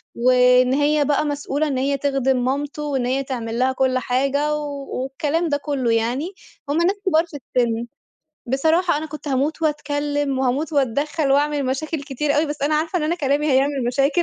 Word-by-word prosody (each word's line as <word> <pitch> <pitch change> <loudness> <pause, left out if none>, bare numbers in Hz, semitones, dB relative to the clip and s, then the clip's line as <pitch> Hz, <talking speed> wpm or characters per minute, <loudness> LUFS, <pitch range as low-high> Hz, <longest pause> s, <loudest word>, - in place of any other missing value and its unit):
وإن 250 +1 +4
هي 295 +1 +2
بقى 295 +2 +1
مسؤولة 290 +1 -1
إن 275 -3 -1
هي 275 +2 0
تخدم 270 -2 0
مامته 285 +3 -2
وإن 275 -4 -1
هي 265 +2 0
تعمل 235 -3 -4
لها 260 +1 +3
كلّ 260 0 +1
حاجة، 275 +4 0
و 285 -2 -5 0.2
والكلام 305 +5 -1
ده 290 - +1
كلّه 280 -5 -1
يعني، 245 - -1 0.4
هُم 290 - +1
ناس 350 +4 +2
كبار 330 -3 +3
في 325 -4 -9 0.2
السن، 235 -1 +1 0.6
بصراحة 320 +6 +2
أنا 315 - -5
كنت 305 -1 -8
هاموت 285 +4 -1
وأتكلّم 290 -2 -1
وهاموت 265 +5 0
وأتدخّل 285 +2 0
وأعمل 290 0 +1
مشاكل 290 +3 -2
كتير 285 +2 -1
أوي 305 +2 +2
بس 295 -1 -5
أنا 300 +2 +2
عارفة 320 +4 0
إن - - -3
أنا 310 +3 +1
كلامي 290 -2 0
هيعمل 270 0 +2
مشاكل، 275 +6 +2
285 Hz, 180 wpm, -21 LUFS, 260-300 Hz, 0.6 s, وإن